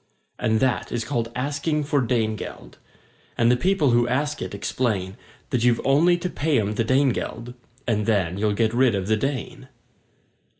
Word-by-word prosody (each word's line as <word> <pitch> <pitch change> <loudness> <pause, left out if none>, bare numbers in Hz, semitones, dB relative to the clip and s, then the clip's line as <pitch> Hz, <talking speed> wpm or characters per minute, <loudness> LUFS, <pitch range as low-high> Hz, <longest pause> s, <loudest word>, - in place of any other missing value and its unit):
And 110 0 +1
that 130 -2 0
is 115 -2 -2
called 115 -3 -2
asking 145 +4 -1
for 145 -1 +1
Dane 115 -3 0
geld, - - -9 0.6
And 120 0 +4
the - - +5
people 155 0 +2
who 120 0 +3
ask 140 +4 -1
it 95 +2 -5
explain 100 -3 -2 0.4
That 125 -3 0
you've 120 -1 +3
only 160 +6 +4
to 175 - -3
pay 155 -5 0
'em 105 0 -1
the 115 - 0
Dane 130 +4 +3
geld 120 0 -4 0.3
And 105 -2 0
then 95 -6 +1
you'll 105 0 +1
get 110 0 +1
rid 125 -2 +3
of 95 -2 -2
the 110 +2 +2
Dane! 135 +2 -4
120 Hz, 180 wpm, -23 LUFS, 110-140 Hz, 0.6 s, the